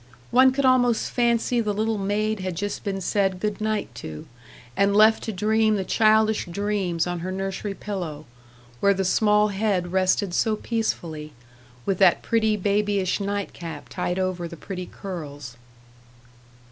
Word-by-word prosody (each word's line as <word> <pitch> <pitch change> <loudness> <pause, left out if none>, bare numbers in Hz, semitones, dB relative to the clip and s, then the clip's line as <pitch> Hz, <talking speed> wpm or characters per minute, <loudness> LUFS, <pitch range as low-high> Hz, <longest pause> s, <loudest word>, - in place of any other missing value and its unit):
One 260 +2 +6
could 275 +1 0
almost 245 -3 +3
fancy 235 0 +1
the 210 -2 -1
little 220 0 0
maid 210 +2 -1
had 185 -2 -3
just 205 +4 -4
been 195 -2 -3
said 190 0 0
"good 210 +1 -2
night" 215 - -2
to, 75 -1 -8 0.5
and 200 0 +2
left 220 +1 +6
to 225 - -2
dream 215 +2 +2
the 195 - -1
childish 220 0 +3
dreams 185 -2 -1
on 175 -1 -3
her 185 +2 -4
nursery 195 +1 -4
pillow, 175 -8 -5 0.5
where 200 0 +3
the 190 0 -1
small 210 +2 +3
head 195 -3 -1
rested 185 0 +1
so 220 +4 +2
peacefully, 165 -10 -3 0.5
with 195 -2 0
that 190 -3 +5
pretty 220 -2 +1
babyish 200 -1 0
nightcap 195 -6 -5
tied 180 0 -2
over 185 -2 -2
the 170 - -10
pretty 180 +1 -6
curls. 145 -9 -8
200 Hz, 150 wpm, -24 LUFS, 180-215 Hz, 0.5 s, One